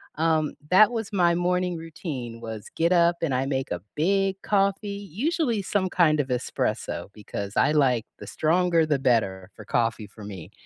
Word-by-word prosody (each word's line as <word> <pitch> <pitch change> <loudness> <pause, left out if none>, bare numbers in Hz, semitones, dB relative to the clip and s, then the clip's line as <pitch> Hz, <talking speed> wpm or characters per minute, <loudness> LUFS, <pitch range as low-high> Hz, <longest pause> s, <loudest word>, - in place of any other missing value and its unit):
um, 155 -1 +1
that 210 +5 +6
was 225 -3 -4
my 175 -3 +3
morning 180 0 0
routine, 150 -8 -6
was 110 -3 -7
get 170 +2 +2
up 170 -1 +4
and 155 -5 0
I 130 +1 0
make 135 -1 -2
a 85 - -3
big 195 +4 +1
coffee, 200 0 +1 0.2
usually 255 - 0
some 190 -1 0
kind 155 -4 +3
of 140 - 0
espresso, 125 -2 -2
because 100 -1 -6
I - - +3
like 130 -7 +2
the - - -9
stronger 170 +1 +2
the 150 -3 0
better 100 -7 +1
for 110 - -11
coffee 115 0 -1
for 105 +1 -12
me. 95 -6 -9
160 Hz, 175 wpm, -25 LUFS, 120-185 Hz, 0.2 s, that